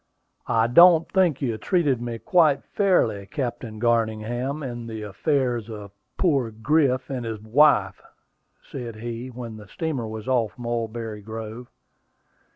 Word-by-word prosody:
"I 115 0 +3
don't 165 +6 +7
think 175 -8 +2
you 115 -4 -1
treated 150 - +1
me 120 -1 -4
quite 165 - +3
fairly, 115 - +1
Captain 120 -5 -4
Garningham, 120 +4 0
in 120 -3 -6
the 110 -1 -6
affairs 120 +1 -1
of 105 -3 -8 0.3
poor 140 -10 +2
Griff 130 +3 +1
and 130 -3 -3
his 110 -2 -4
wife," 140 +8 +3 0.7
said 120 -4 -6
he, 115 +2 -6
when 120 -3 -8
the 105 -1 -12
steamer 140 - -3
was 110 +1 -7
off 120 -5 0
Mulberry 115 -2 -4
Grove. 110 +3 -7
120 Hz, 135 wpm, -24 LUFS, 110-140 Hz, 0.7 s, don't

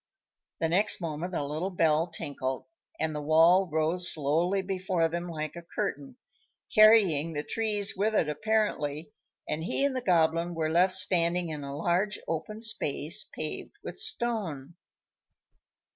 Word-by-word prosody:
The 165 - 0
next 190 +6 +2
moment 170 +1 -4
a 145 - -1
little 155 +6 -3
bell 165 -3 +2
tinkled, 140 -5 -4 0.3
and 155 - -1
the 150 - -4
wall 165 +5 +4
rose 160 +3 +2
slowly 165 +6 +1
before 185 -3 -1
them 170 +2 -4
like 155 -1 -5
a 170 - -7
curtain, 210 +9 -5 0.6
carrying 200 - +5
the 145 -1 -3
trees 210 +1 0
with 215 +3 0
it 165 - +2
apparently, 155 -4 -1 0.4
and 155 +1 -3
he 275 +10 +1
and 280 -2 -1
the 255 - -2
Goblin 170 -3 +1
were 160 -1 -1
left 180 +3 +3
standing 175 -2 +3
in 150 -2 -6
a 140 0 -6
large 180 +6 0
open 210 +7 -4
space 170 -3 0
paved 155 -4 -6
with - - -7
stone. 175 - -3
170 Hz, 145 wpm, -28 LUFS, 155-195 Hz, 0.6 s, carrying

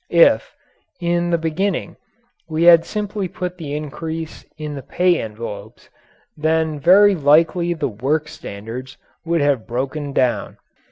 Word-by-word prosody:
If, - - +4 0.4
in 175 0 0
the 170 - +2
beginning, 170 +2 -2 0.5
we 160 +1 0
had 170 -1 +7
simply 210 -2 -3
put 180 +1 -6
the 145 -3 -4
increase 160 +2 -6
in 150 -1 -5
the 140 - -6
pay 180 +4 +1
envelopes, 110 0 -8 0.4
then 160 0 0
very 195 +7 +6
likely 165 +2 +3
the 150 -3 -1
work 140 +8 -1
standards 125 -1 -8 0.3
would 170 -1 +1
have 140 -6 +1
broken 135 +4 -3
down. 130 -3 0
155 Hz, 130 wpm, -20 LUFS, 140-175 Hz, 0.5 s, had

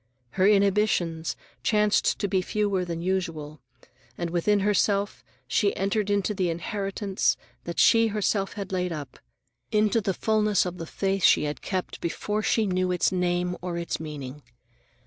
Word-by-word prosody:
Her 190 0 +3
inhibitions 195 -5 +2 0.3
chanced 210 -1 +2
to 200 - -1
be 190 -1 +1
fewer 200 -1 0
than 170 -1 -4
usual, 165 -5 -3 0.6
and, 170 -1 -3
within 200 +4 +2
herself, 205 0 +1 0.2
she 200 - +1
entered 200 +1 0
into 205 0 +1
the 185 -3 0
inheritance 195 +3 -1 0.3
that 170 - -5
she 225 0 +5
herself 205 -2 0
had 200 -1 -6
laid 180 -1 -1
up, 145 -5 -7 0.5
into 215 +2 +3
the 195 -2 -1
fullness 215 -2 +2
of 180 0 -5
the 165 - -5
faith 195 +1 -1
she - - +6
had 150 0 -3
kept 185 -2 -4
before 210 +5 -2
she 220 0 +2
knew 185 -1 0
its 180 +1 +2
name 180 -1 0
or 175 -1 -3
its 170 0 -3
meaning. 150 -3 -7
190 Hz, 155 wpm, -26 LUFS, 175-205 Hz, 0.6 s, she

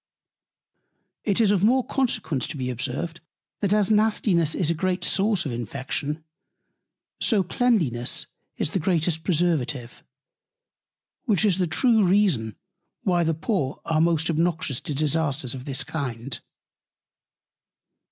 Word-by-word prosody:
It 205 -1 +1
is 215 -3 +4
of 200 -2 +2
more 250 +4 +4
Consequence 160 - -1
to - - -6
be 125 -1 -2
observed, 140 +7 -4 0.4
that 200 -2 0
as 210 -1 +3
Nastiness 210 -7 +2
is 170 -3 +1
a - - +2
great 185 +2 -1
Source 200 -2 +1
of 140 - -2
Infection, 135 +6 -3 1.0
so 210 -5 +2
Cleanliness 175 - +1 0.3
is - - -1
the 190 - 0
greatest 165 -1 +1
Preservative: 150 -8 -1 1.2
Which 215 -4 +2
is 190 -3 +2
the 180 - +2
true 220 +6 +3
Reason, 180 - +2 0.5
why 175 -2 +2
the 165 -1 +1
Poor 160 - -2
are 160 -1 +1
most 165 -1 +2
obnoxious 160 -4 0
to 150 - -4
Disasters 145 -3 0
of 130 -1 -7
this 135 -2 -1
Kind. 130 -4 -4
165 Hz, 130 wpm, -25 LUFS, 140-195 Hz, 1.2 s, is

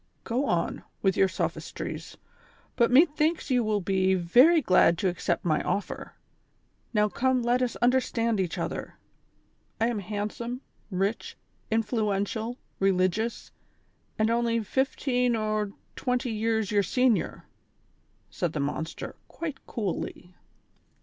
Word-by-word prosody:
'' - - -42
Go 250 +5 0
on, 170 -1 0 0.2
with 195 -1 +3
your 195 - +4
sophistries, 185 - -4 0.6
but 235 -2 +4
methiuks 305 +3 +3
you 250 -2 +3
will 215 -2 0
be 190 0 +2
very 245 - +6
glad 185 - +4
to 190 - 0
accept 180 0 -1
my 155 -3 +2
offer; 205 - -3 0.8
now 210 -2 +3
come 255 +3 +1
let 245 +1 +2
us 250 -2 0
understand 240 -3 +2
each 180 -3 -1
other; - - -4 0.8
I 225 +1 +3
am 230 -3 -2
handsome, 215 +5 -4 0.3
rich, 195 +3 -2 0.3
influential, 220 +1 -1 0.2
religious 195 +4 +1 0.7
and 220 +1 +2
only 230 -1 +1
fifteen 250 +1 +1
ortwenty 220 +3 -2
years 220 -1 0
your 205 -1 +4
senior," 250 +2 +1 0.9
said 175 -3 -2
the 150 - -2
monster, 145 +3 -3
quite 305 -5 -6
coolly. 185 -4 -4
220 Hz, 120 wpm, -27 LUFS, 195-245 Hz, 0.9 s, very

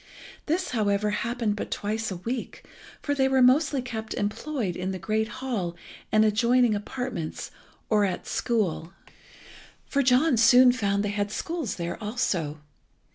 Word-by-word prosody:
This, 350 +4 0
however, 210 -3 +1
happened 230 -1 -1
but - - -5
twice 220 +2 -2
a 190 - -4
week, 230 +8 -5 0.4
for 285 - 0
they 265 -2 +2
were 265 0 +2
mostly 275 +1 +3
kept 220 -3 -5
employed 210 - -2
in 185 +1 -3
the 190 - -3
great 215 +4 -1
hall 235 -8 -4 0.4
and 215 0 +5
adjoining 235 +2 +3
apartments 210 -5 -4 0.4
or 210 -2 +3
at 190 -2 -2
school. 190 -7 -1 0.9
For 280 - 0
John 255 +2 +3
soon 245 +3 +7
found 200 -4 0
they - - -1
had 205 0 -1
schools 320 - -3
there 170 +3 -5
also. 175 -9 -2
220 Hz, 145 wpm, -26 LUFS, 205-255 Hz, 0.9 s, soon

